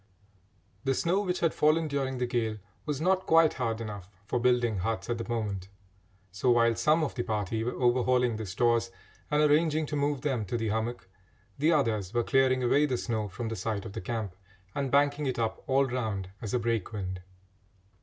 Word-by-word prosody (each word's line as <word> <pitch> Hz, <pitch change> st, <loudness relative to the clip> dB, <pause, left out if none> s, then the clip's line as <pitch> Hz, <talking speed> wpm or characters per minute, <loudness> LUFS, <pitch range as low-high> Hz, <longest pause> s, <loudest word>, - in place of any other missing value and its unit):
The 135 Hz, -1 st, +1 dB
snow 180 Hz, +7 st, +1 dB
which 180 Hz, -3 st, -2 dB
had 165 Hz, -2 st, +2 dB
fallen 155 Hz, +1 st, +3 dB
during 135 Hz, -3 st, -2 dB
the 125 Hz, -, 0 dB
gale 115 Hz, -3 st, -1 dB, 0.3 s
was 145 Hz, -2 st, -1 dB
not 185 Hz, +3 st, +1 dB
quite 165 Hz, -1 st, +5 dB
hard 115 Hz, -2 st, 0 dB
enough 105 Hz, -4 st, -7 dB, 0.2 s
for 125 Hz, -, -1 dB
building 120 Hz, -3 st, +2 dB
huts 110 Hz, +5 st, -2 dB
at 120 Hz, -, -2 dB
the 115 Hz, -, -5 dB
moment, 100 Hz, -5 st, -3 dB, 0.6 s
so 100 Hz, +7 st, 0 dB
while 115 Hz, -1 st, +4 dB
some 155 Hz, +5 st, +3 dB
of 150 Hz, -, -2 dB
the 120 Hz, -, -2 dB
party 110 Hz, -1 st, -2 dB
were 120 Hz, +1 st, -3 dB
overhauling 125 Hz, -1 st, +2 dB
the 110 Hz, -1 st, -5 dB
stores 115 Hz, +4 st, +1 dB, 0.4 s
and 150 Hz, 0 st, +3 dB
arranging 155 Hz, +1 st, +3 dB
to 150 Hz, -, -4 dB
move 145 Hz, -1 st, 0 dB
them 135 Hz, -6 st, -1 dB
to 110 Hz, +5 st, -2 dB
the 110 Hz, -1 st, -1 dB
hummock, 110 Hz, 0 st, -2 dB, 0.5 s
the 155 Hz, +4 st, +3 dB
others 115 Hz, -, 0 dB
were 120 Hz, -, +3 dB
clearing 130 Hz, 0 st, +3 dB
away 145 Hz, +5 st, +3 dB
the 130 Hz, -3 st, 0 dB
snow 110 Hz, -3 st, -2 dB
from 115 Hz, +4 st, -5 dB
the 115 Hz, -, -3 dB
site 100 Hz, +1 st, -3 dB
of 105 Hz, -, -7 dB
the -, -, -5 dB
camp 105 Hz, -2 st, -4 dB, 0.4 s
and 140 Hz, -1 st, -1 dB
banking 145 Hz, +1 st, +2 dB
it 130 Hz, -, -1 dB
up 110 Hz, -1 st, -2 dB
all 135 Hz, +1 st, +3 dB
round 110 Hz, -7 st, -3 dB
as 110 Hz, -, -4 dB
a -, -, +4 dB
break 115 Hz, -4 st, -1 dB
wind. 95 Hz, -4 st, -4 dB
120 Hz, 200 wpm, -29 LUFS, 110-140 Hz, 0.6 s, quite